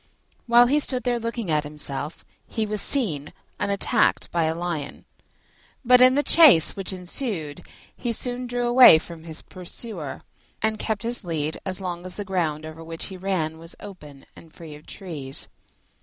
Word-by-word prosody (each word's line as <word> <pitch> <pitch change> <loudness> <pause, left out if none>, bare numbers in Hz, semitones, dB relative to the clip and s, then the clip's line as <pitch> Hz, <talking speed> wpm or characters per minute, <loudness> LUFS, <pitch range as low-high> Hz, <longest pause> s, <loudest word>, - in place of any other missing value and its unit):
While 240 +1 +6
he 285 +5 +2
stood 255 -3 -1
there 245 -1 0
looking 230 -5 -4
at 150 -1 +1
himself, 150 0 -6 0.2
he 220 -2 -2
was 210 -1 -2
seen 165 - 0 0.3
and 205 - -1
attacked 200 - +1
by 170 -2 +1
a 160 +1 -1
Lion; 170 -4 -5 0.8
but 250 +1 +6
in 255 +1 +6
the 290 - +2
chase 295 - +6
which 195 -1 -4
ensued, 180 - -4 0.3
he 240 - -3
soon 245 +2 -3
drew 245 0 -2
away 240 -8 +8
from 165 0 -9
his 160 -1 -5
pursuer, 180 - -8 0.4
and 220 0 -1
kept 220 0 -2
his 235 0 -2
lead 160 -3 -3
as 185 0 -2
long 175 -2 -5
as 185 0 -7
the 205 - -5
ground 160 -5 -2
over 155 +1 -9
which 165 0 -7
he - - -7
ran 175 -4 -2
was 165 +1 -9
open 150 -9 -12
and 160 -1 -17
free 160 -3 -10
of 150 +1 -14
trees. 150 -8 +1
180 Hz, 175 wpm, -24 LUFS, 160-235 Hz, 0.8 s, away